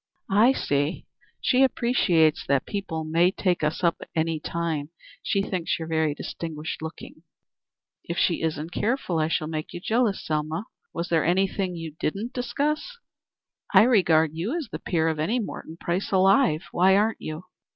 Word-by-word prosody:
"I 220 +7 +5
see. 145 - -1 0.4
She 255 - +3
appreciates 215 - +3
that 140 -1 +2
people 190 -6 -4
may 165 +3 +3
take 180 -3 0
us 150 +3 -1
up 170 -1 +2
any 160 0 0
time. 160 -2 -3 0.3
She 195 - 0
thinks 185 -4 -1
you 165 - -5
are 160 -2 +1
distinguished 160 0 -5
looking." 160 0 -8 0.8
"If 170 - -4
she 170 - +2
isn't 160 0 -2
careful, 210 -5 -1
I 155 - +2
shall 160 -1 0
make 155 0 -5
you - - -5
jealous, 220 +1 0
Selma. 155 +5 -2 0.3
Was 170 +1 -4
there 165 -2 +2
anything 190 +1 +1
you 165 -2 -7
didn't 205 +10 -2
discuss?" 290 - -2 0.8
"I - - +9
regard 165 -10 +4
you 195 - -2
as 320 - -5
the - - -5
peer 165 -2 0
of 160 -1 -1
any 190 +11 +1
Morton 165 -6 -6
Price 175 +3 -2
alive. 190 - +4
Why 190 +2 +4
aren't 215 +2 +1
you?" 155 +2 -6
170 Hz, 160 wpm, -25 LUFS, 160-200 Hz, 0.8 s, I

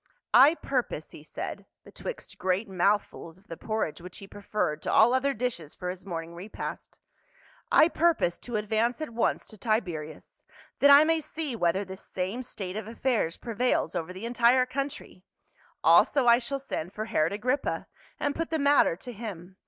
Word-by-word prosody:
" - - -61
I 310 - +2
purpose," 250 - -3
he - - -11
said, 155 - -7 0.2
betwixt - - -8
great 190 +4 0
mouthfuls 190 -3 -1
of 190 - -24
the 165 - -5
porridge 215 -5 -3
which 180 +1 -10
he 195 - -9
preferred 200 -6 -3
to - - -2
all 235 +3 +6
other 265 +2 +2
dishes 215 - -3
for 180 0 -4
his 185 +1 -11
morning 165 -2 -5
repast, 185 +5 -7 0.4
" - - -30
I 315 - +7
purpose 330 - +1
to 240 - -6
advance 220 +4 0
at 310 -5 -5
once 230 0 0
to 215 - -13
Tiberias, 175 -9 -3 0.4
that 285 - +6
I 285 +1 +9
may 325 0 +2
see 305 -3 -4
whether 190 0 +1
this 190 0 -9
same 190 +7 -4
state 195 -7 -6
of 215 -1 -5
affairs 230 -7 -1
prevails 240 +1 0
over 175 -1 -3
the 190 +5 -7
entire 245 +1 +4
country; 275 -8 -5 0.6
also 275 -3 +5
I 235 0 +6
shall 255 +3 -3
send 195 -10 -5
for 215 - -4
Herod 155 -7 +1
Agrippa 250 +7 -1 0.3
and 285 - 0
put 330 0 -3
the 320 - 0
matter 285 - +4
to 245 +8 -9
him. 195 -5 -8
220 Hz, 180 wpm, -28 LUFS, 180-255 Hz, 0.6 s, I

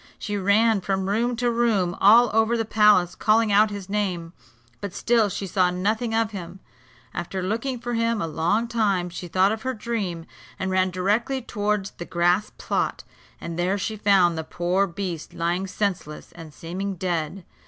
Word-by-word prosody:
She 205 - -4
ran 205 +2 +3
from 190 0 -1
room 235 +5 0
to 240 +1 0
room 215 -7 +1
all 230 +4 +7
over 225 +2 +3
the 225 - -1
palace, 210 -5 +4
calling 220 0 +2
out 210 +2 +5
his 200 -2 -7
name, 185 -5 -2 0.5
but 200 -3 -6
still 230 -3 +2
she 195 - -4
saw 185 -1 +2
nothing 215 +6 -1
of 225 -1 +1
him. 185 -2 -8 0.5
After 185 +2 -4
looking 230 +7 -2
for 240 0 -5
him 230 -1 +1
a 165 - -1
long 170 +9 0
time, 200 -6 0
she 175 +1 -7
thought 185 +4 +3
of 220 0 -3
her 260 0 -3
dream, 205 -7 -3 0.3
and 190 0 -2
ran 185 0 +2
directly 205 +9 0
towards 210 -4 -2
the 175 - -8
grass 175 +5 +1
plot; - - -2 0.4
and 170 0 -6
there 185 +3 +1
she 215 +2 -3
found 190 -5 +3
the - - -3
poor 180 +5 0
beast 175 -3 -6
lying 175 +3 -1
senseless 185 -6 -3
and 165 -3 -11
seeming 185 +6 -5
dead. 175 0 -3
200 Hz, 175 wpm, -24 LUFS, 180-220 Hz, 0.5 s, all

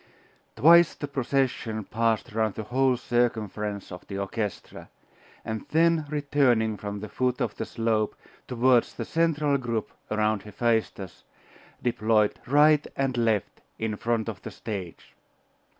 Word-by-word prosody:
Twice 170 +2 +6
the 145 - -5
procession 130 -5 -1
passed 115 +1 0
round 110 -2 0
the 110 - -4
whole 130 +3 +2
circumference 110 -5 -1
of 90 - -10
the 100 - -5
orchestra, 100 +1 -5 0.6
and 110 0 -5
then 165 -1 +3
returning 135 -7 +2
from 100 0 -6
the 105 - -5
foot 125 +1 -1
of - - -2
the - - -4
slope 110 -2 0 0.3
towards 125 0 +2
the 115 - -4
central 150 -3 +1
group 115 -4 -3 0.2
around 110 -1 +1
Hephaestus, 105 -3 -2 0.6
deployed 110 -3 +2
right 150 +2 +5
and 135 -2 0
left 115 -4 0 0.2
in 110 -1 -2
front 115 +1 -1
of 110 -3 -5
the - - -7
stage. 100 -6 -7
115 Hz, 135 wpm, -26 LUFS, 105-135 Hz, 0.6 s, Twice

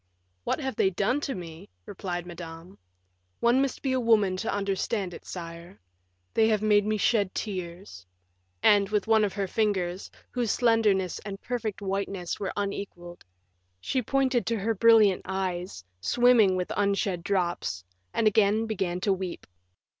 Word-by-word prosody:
"What - - 0
have 265 -5 -3
they 190 - +4
done 210 +9 0
to 280 - -3
me?" 165 - -9 0.2
replied 175 -3 -5
Madame. 170 - -10 0.6
"One 240 +3 +4
must 275 -2 -2
be 270 - 0
a 260 - +1
woman 215 -5 +3
to - - -2
understand 200 -1 -1
it, - - -11
sire 170 +1 -8 0.5
they 220 - +4
have 215 -1 +1
made 210 -1 +4
me 215 0 +1
shed 205 -2 +1
tears;" 185 - -6 0.6
and, 200 -2 +5
with 210 -1 0
one 220 -1 +4
of 205 - 0
her 200 -2 -2
fingers, 190 -3 -1 0.2
whose 245 -3 -1
slenderness 210 -6 +2
and 195 -2 -7
perfect 225 -5 -4
whiteness 195 -2 -3
were 195 -2 -2
unequaled, 195 -4 -5 0.6
she 255 - -1
pointed 260 0 +1
to 230 - +1
her 220 +3 0
brilliant 220 -3 +5
eyes 180 - -3
swimming 230 - +4
with 180 -1 -2
unshed 200 -3 0
drops, 175 - -1 0.3
and 225 - 0
again 215 +1 +3
began 190 -5 -2
to 200 0 +2
weep. 185 -2 -5
200 Hz, 155 wpm, -27 LUFS, 180-220 Hz, 0.6 s, and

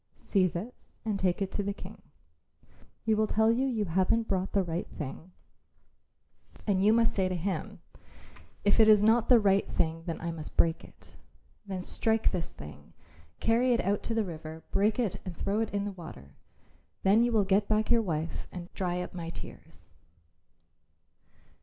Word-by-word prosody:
Seize 185 -4 +1
it 215 +9 -7
and 210 -3 -1
take 185 +1 +1
it 190 - -4
to - - -2
the 200 0 -3
King. 200 +2 -11 1.0
He 220 - +3
will 215 0 +2
tell 220 +1 +3
you 255 +4 +1
you 225 -5 -1
haven't 190 +6 +1
brought 190 -1 -1
the 195 - +3
right 170 0 -3
thing, 155 +4 -7 1.3
and 195 -3 +2
you 210 - +6
must 230 0 +3
say 190 -2 +1
to 185 - -2
him, 180 -1 -3 0.8
'If 205 +2 +3
it 220 - +7
is 210 -1 +6
not 225 +2 +4
the 245 -2 +8
right 200 -2 +2
thing 165 0 0
then 165 - -3
I 170 0 -3
must 160 -2 -8
break 165 0 +2
it.' - - -17 0.5
Then 190 -2 -4
strike 225 +3 +1
this 175 -4 -3
thing; 75 +1 -12 0.5
carry 240 +3 +3
it 235 - +2
out 200 +1 0
to 225 - 0
the 225 -2 +1
river; 160 -2 -8
break 210 +2 +2
it 230 -7 -1
and 180 -4 -7
throw 200 +2 -1
it 225 -1 0
into 200 0 -2
the - - -14
water. 70 - -11 0.7
Then 205 +4 +5
you 240 - +1
will 220 -3 +3
get 200 +1 +2
back 215 +1 +1
your 235 -1 +5
wife 165 -5 -3
and 175 -1 -8
dry 180 -1 -2
up - - -9
my 170 -2 -5
tears." - - -11
195 Hz, 185 wpm, -29 LUFS, 175-220 Hz, 1.3 s, the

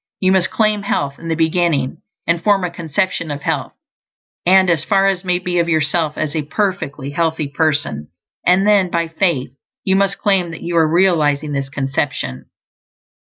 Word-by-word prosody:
You 185 -1 +2
must 190 -2 +2
claim 215 -2 +1
health 140 -8 -2
in 165 - -8
the 165 - 0
beginning, 160 -4 +1 0.3
and 170 0 +1
form 200 -3 +3
a 180 - -2
conception 170 0 -2
of 145 -1 -5
health, - - -2 0.7
and, 190 +1 +6
as 165 -4 +2
far 195 +1 +2
as 190 -2 0
may 180 -1 +1
be, 180 -1 -1
of 170 0 +1
yourself 155 0 0
as 155 -1 -2
a 155 - +1
perfectly 150 -5 -3
healthy 160 -1 -1
person; 145 - -1 0.4
and 185 +2 +3
then, 205 -3 +4
by 170 -1 0
faith, 160 -7 0 0.3
you 190 -1 +2
must 200 0 +1
claim 195 -4 +1
that 165 - -9
you 170 0 -3
ARE 160 -1 +4
REALIZING 155 -4 +2
this 140 -1 -2
conception. 135 - -3
165 Hz, 175 wpm, -18 LUFS, 145-185 Hz, 0.7 s, and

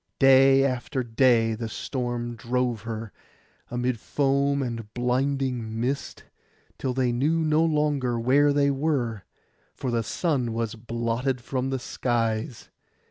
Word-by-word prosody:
Day 135 0 +6
after 130 0 -2
day 115 -1 +3
the 115 0 -4
storm 120 -1 -3
drove 120 -1 -1
her, 115 0 -6 0.6
amid 125 -1 -1
foam 140 +2 +1
and 115 -4 -5
blinding 125 -2 -1
mist, 135 +4 -3 0.6
till 130 -2 -2
they 130 -2 +1
knew 150 +7 +1
no 155 +1 +3
longer 150 -6 +1
where 140 +5 +4
they 140 0 +3
were, 135 - -1 0.5
for 130 - -3
the 115 -1 +1
sun 125 -2 -1
was 115 -1 -2
blotted 120 +3 -2
from 130 +2 -3
the 135 - -1
skies. 115 -2 -2
125 Hz, 130 wpm, -26 LUFS, 115-135 Hz, 0.6 s, Day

